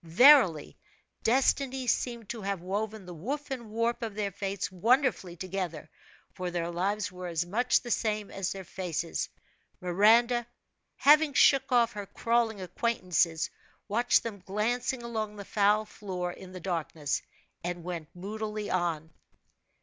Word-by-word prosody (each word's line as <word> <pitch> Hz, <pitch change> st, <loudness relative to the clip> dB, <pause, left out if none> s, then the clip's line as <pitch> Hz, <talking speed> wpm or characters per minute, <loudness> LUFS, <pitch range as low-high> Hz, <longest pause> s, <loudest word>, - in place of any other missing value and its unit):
Verily, 180 Hz, -, +6 dB, 0.5 s
destiny 265 Hz, +2 st, +2 dB
seemed 235 Hz, -2 st, -1 dB
to 230 Hz, -, -5 dB
have 200 Hz, -1 st, -2 dB
woven 205 Hz, +3 st, -3 dB
the 180 Hz, -, -8 dB
woof 275 Hz, -, -5 dB
and 240 Hz, -4 st, -5 dB
warp 230 Hz, +3 st, -1 dB
of 225 Hz, -3 st, -4 dB
their 205 Hz, -2 st, -1 dB
fates 195 Hz, 0 st, -3 dB
wonderfully 215 Hz, -, +2 dB
together, 180 Hz, -3 st, -4 dB, 0.5 s
for 180 Hz, -1 st, -4 dB
their 175 Hz, -1 st, -2 dB
lives 200 Hz, +4 st, -1 dB
were 180 Hz, 0 st, -7 dB
as 170 Hz, 0 st, -1 dB
much 235 Hz, +8 st, +2 dB
the 240 Hz, -, -6 dB
same 215 Hz, -3 st, -1 dB
as 195 Hz, -2 st, -2 dB
their 195 Hz, -1 st, -6 dB
faces. 170 Hz, -, -3 dB, 0.5 s
Miranda, 230 Hz, +6 st, +4 dB, 0.5 s
having 300 Hz, 0 st, +5 dB
shook 275 Hz, -1 st, +5 dB
off 235 Hz, -2 st, +4 dB
her 205 Hz, -1 st, -6 dB
crawling 230 Hz, -1 st, 0 dB
acquaintances, 180 Hz, -4 st, 0 dB, 0.4 s
watched 235 Hz, +4 st, +3 dB
them 220 Hz, -3 st, -5 dB
glancing 240 Hz, +6 st, -1 dB
along 220 Hz, -3 st, -3 dB
the 200 Hz, -1 st, -8 dB
foul 210 Hz, +2 st, +3 dB
floor 185 Hz, -4 st, -5 dB
in 185 Hz, +1 st, -11 dB
the 185 Hz, -, -8 dB
darkness, 160 Hz, -4 st, -2 dB, 0.4 s
and 175 Hz, 0 st, -4 dB
went 170 Hz, -3 st, -5 dB
moodily 210 Hz, +2 st, -4 dB
on. 165 Hz, -3 st, -1 dB
205 Hz, 140 wpm, -29 LUFS, 180-235 Hz, 0.5 s, Verily